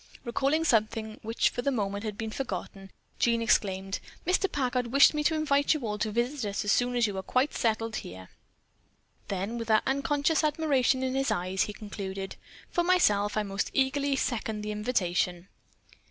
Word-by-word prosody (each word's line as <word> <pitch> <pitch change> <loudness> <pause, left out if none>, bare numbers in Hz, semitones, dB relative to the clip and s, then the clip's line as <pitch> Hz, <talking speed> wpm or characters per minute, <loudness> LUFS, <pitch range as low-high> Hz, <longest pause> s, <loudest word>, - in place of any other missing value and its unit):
Recalling 275 +6 +1
something 220 -4 0
which 225 +1 +1
for 245 - -3
the 280 - +1
moment 205 -5 -2
had 210 -2 -4
been 220 0 -4
forgotten, 195 -5 -5 0.3
Jean 235 -1 +3
exclaimed: 195 -4 +1 0.3
"Mr. 370 +3 +2
Packard 250 -3 0
wished 275 +5 +6
me 300 0 -1
to 320 +2 +2
invite 285 -1 +2
you 305 - -3
all 210 -1 -3
to 220 - 0
visit 240 +1 -1
us 200 - -3
as 205 - +2
soon 245 +3 +2
as 240 -1 +3
you 205 -2 -3
are 190 - -2
quite 255 +9 0
settled 225 -1 0
here." 95 +1 -9 1.0
Then 200 +5 -3
with 230 - -5
that 220 -1 +4
unconscious 285 +4 +1
admiration 290 -4 +2
in 260 0 -1
his 270 +1 0
eyes, 185 +2 0
he 210 - -6
concluded: 195 -2 -6 0.4
"For 345 - +1
myself 210 - +3
I 215 - +2
most 195 0 -2
eagerly 275 +1 +1
second 220 -5 -2
the 210 - -3
invitation." 185 -5 -1
230 Hz, 180 wpm, -28 LUFS, 205-275 Hz, 1.0 s, wished